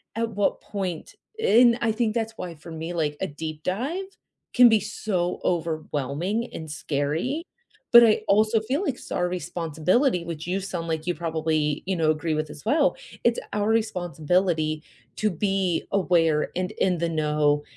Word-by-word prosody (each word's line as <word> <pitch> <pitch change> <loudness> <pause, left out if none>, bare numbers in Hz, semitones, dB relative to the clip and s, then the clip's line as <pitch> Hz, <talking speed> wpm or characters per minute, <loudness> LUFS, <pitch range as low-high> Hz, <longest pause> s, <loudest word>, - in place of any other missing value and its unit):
at 230 0 -1
what 205 0 0
point 185 -5 -5 0.3
and 240 - +5
I 225 -2 +2
think 220 -1 0
that's 225 -1 -2
why 175 -2 -5
for 165 +3 -13
me, 160 +2 -5
like 150 -3 -1
a - - -1
deep 155 +1 -7
dive 275 - -2 0.5
can 245 -1 +8
be 220 -1 +4
so 190 -3 -2
overwhelming 165 - -1
and 160 -1 -7
scary, 155 - -2 0.5
but 235 -1 +10
I 215 - +3
also 215 +2 +4
feel 260 - -1
like 280 - 0
it's - - -13
our 180 0 +1
responsibility, 175 - 0
which 165 -1 -6
you 185 +2 -1
sound 180 -3 -4
like 160 +1 -3
you 175 - 0
probably, 155 -2 -1
you 190 - 0
know, 160 -2 +3
agree 155 0 -1
with 155 -1 -2
as 145 - -11
well. 285 -2 +3 0.3
It's 235 0 +3
our 210 0 0
responsibility 175 -6 0 0.3
to 215 -2 +1
be 195 -1 0
aware 165 -5 +2
and 180 0 -1
in 180 -5 +1
the 170 0 0
know, 150 -2 +1
175 Hz, 170 wpm, -25 LUFS, 155-215 Hz, 0.5 s, but